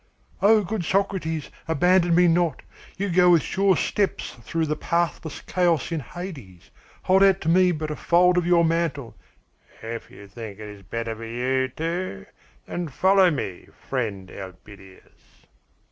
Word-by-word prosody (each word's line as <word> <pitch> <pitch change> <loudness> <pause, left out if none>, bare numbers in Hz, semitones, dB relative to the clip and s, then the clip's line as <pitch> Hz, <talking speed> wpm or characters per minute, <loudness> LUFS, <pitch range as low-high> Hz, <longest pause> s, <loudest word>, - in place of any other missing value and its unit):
"Oh, 210 +1 +5
good 200 0 -3
Socrates, 175 -4 -1 0.2
abandon 175 +2 +3
me 180 +1 +5
not! 170 -3 +1 0.3
You 200 +2 -1
go 180 +1 +5
with 170 -5 +5
sure 195 -1 +2
steps 200 -2 -1
through 165 -1 -2
the 150 0 -1
pathless 170 -2 -2
chaos 175 -4 0
in 165 - -1
Hades. 135 - -9 0.3
Hold 190 +1 +4
out 195 -1 +5
to 160 - -1
me 180 +1 +4
but 155 -2 -4
a - - -3
fold 180 +3 +3
of 175 -1 +1
your 170 -1 +4
mantle 160 -7 -1 0.4
" - - -28
"If 115 - -9
you 100 - -13
think 105 -1 -9
it 105 - -8
is 105 -1 -11
better 115 +4 -4
for 115 +1 -8
you, 130 +3 0
too, 165 - -4 0.4
then 175 -1 -4
follow 190 +6 +4
me, 100 - -4 0.2
friend 105 -8 -3
Elpidias." 95 0 -14
165 Hz, 160 wpm, -24 LUFS, 120-180 Hz, 0.4 s, Oh